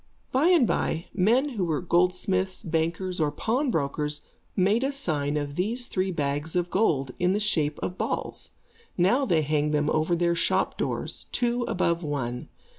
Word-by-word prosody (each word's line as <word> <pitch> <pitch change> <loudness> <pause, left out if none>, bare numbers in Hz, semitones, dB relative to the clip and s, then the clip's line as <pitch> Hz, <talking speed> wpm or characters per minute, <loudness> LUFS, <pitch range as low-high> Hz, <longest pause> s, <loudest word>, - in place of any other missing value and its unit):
By 270 +6 +3
and 345 -8 +5
by, 165 -6 -1
men 235 +9 +3
who 210 -9 -2
were 155 -3 0
goldsmiths, 185 +2 +1
bankers 170 +2 -1
or 150 -1 +2
pawnbrokers, 150 - -1 0.3
made 200 +6 +3
a 270 - +1
sign 150 - -1
of 145 -1 -3
these 220 - -1
three 190 -5 -1
bags 145 0 -2
of 175 -1 0
gold, 145 - +1
in 180 +1 +2
the 205 - +1
shape 155 -8 0
of 180 - -4
balls. - - -3 0.5
Now 240 +10 +3
they 165 -5 +3
hang 150 0 +1
them 150 0 +1
over 155 +3 +1
their 170 0 +2
shop 170 - +1
doors, - - -4
two 240 0 0
above 170 -2 0
one. 135 -6 -3
175 Hz, 165 wpm, -26 LUFS, 150-210 Hz, 0.5 s, and